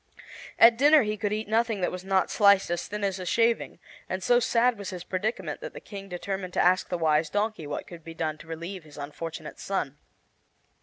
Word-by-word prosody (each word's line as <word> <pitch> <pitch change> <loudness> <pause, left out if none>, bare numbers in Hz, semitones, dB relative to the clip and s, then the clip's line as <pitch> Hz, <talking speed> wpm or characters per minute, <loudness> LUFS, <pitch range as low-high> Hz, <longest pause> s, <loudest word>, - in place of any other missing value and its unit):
At 230 0 +7
dinner 295 +1 +6
he 210 0 -1
could 205 -1 -2
eat 215 0 -2
nothing 225 -1 +1
that 180 - 0
was 180 0 -6
not 190 -1 +1
sliced 200 -4 +4
as 175 0 -2
thin 210 0 -5
as 195 -1 -1
a 185 - -5
shaving, 230 +2 +1 0.3
and 185 0 -3
so 240 +4 +4
sad 235 -1 +2
was 200 -2 -5
his 180 -3 -6
predicament 205 - -3
that - - -7
the - - -8
King 195 -1 -9
determined 185 0 -4
to - - -1
ask 185 +1 +3
the 180 - -1
Wise 160 -1 +2
Donkey 205 -6 -2
what 145 - -4
could 170 -2 -11
be 165 0 -9
done 155 -2 -3
to - - -13
relieve 170 +3 -6
his 150 -1 -15
unfortunate 155 +2 -7
son. 150 -7 -3
190 Hz, 215 wpm, -27 LUFS, 170-215 Hz, 0.3 s, At